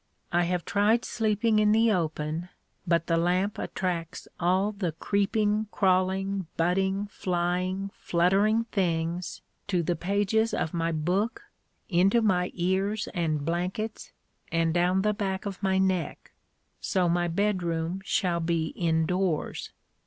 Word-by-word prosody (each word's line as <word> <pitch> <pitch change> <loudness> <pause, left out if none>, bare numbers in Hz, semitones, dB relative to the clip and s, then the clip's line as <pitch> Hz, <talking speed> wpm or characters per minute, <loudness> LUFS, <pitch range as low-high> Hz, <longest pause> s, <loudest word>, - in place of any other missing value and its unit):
I 175 0 +2
have 175 0 -1
tried 215 +4 +2
sleeping 220 0 +1
in 210 0 +4
the 225 +1 +4
open, 160 -1 -2 0.4
but 170 -1 +2
the 165 -1 +1
lamp 180 +4 +1
attracts 175 -3 -3
all 185 +4 +2
the 195 -6 -3
creeping, 210 +4 0
crawling, 190 -1 +1
butting, 190 +4 +1
flying, 185 +2 -1
fluttering 195 +6 +2
things 170 -2 -1 0.2
to 180 -4 +1
the 175 +2 0
pages 205 +5 +1
of 160 - -2
my 165 -1 0
book, 190 - -1 0.4
into 195 +5 +3
my 180 -4 +2
ears 190 +4 0
and 155 -4 -1
blankets, 180 +6 -3 0.4
and 165 0 +1
down 180 +2 +2
the 210 0 +2
back 195 -2 -3
of 195 -1 -5
my 190 -1 +2
neck. 185 -5 -1 0.5
So 180 -2 +1
my 175 +1 +1
bedroom 175 -2 -1
shall 175 -1 0
be 165 -1 0
indoors. 165 0 -1
185 Hz, 130 wpm, -27 LUFS, 170-200 Hz, 0.5 s, in